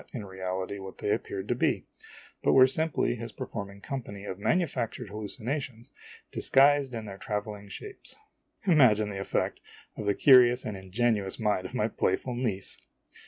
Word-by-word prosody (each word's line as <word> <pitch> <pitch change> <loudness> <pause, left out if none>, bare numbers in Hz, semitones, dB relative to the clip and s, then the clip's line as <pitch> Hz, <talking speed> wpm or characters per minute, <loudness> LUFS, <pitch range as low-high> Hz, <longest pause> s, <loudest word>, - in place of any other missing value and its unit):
in 115 -6 -5
reality, 95 +1 -4
what 95 -1 -9
they 105 - -1
appeared 95 -1 -2
to 120 - +2
be, 120 - 0 0.6
but - - +3
were 130 -1 +9
simply 155 0 +1
his 115 0 -6
performing 100 -2 -6
company 100 -4 -6
of 95 -1 -5
manufactured 125 - -1
hallucinations 115 +4 -4 0.4
disguised 140 -1 +4
in 110 -1 -5
their 100 -2 -8
traveling 105 -1 -4
shapes. 400 - -8 0.5
Imagine 120 - +5
the 100 - -5
effect 95 - -1 0.3
upon 105 - -6
the 100 - +3
curious 125 -2 +6
and 105 - -3
ingenuous 100 +1 0
mind 105 -4 0
of - - -10
my - - +2
playful 125 - -1
niece 115 -6 -3
110 Hz, 155 wpm, -29 LUFS, 100-130 Hz, 0.6 s, were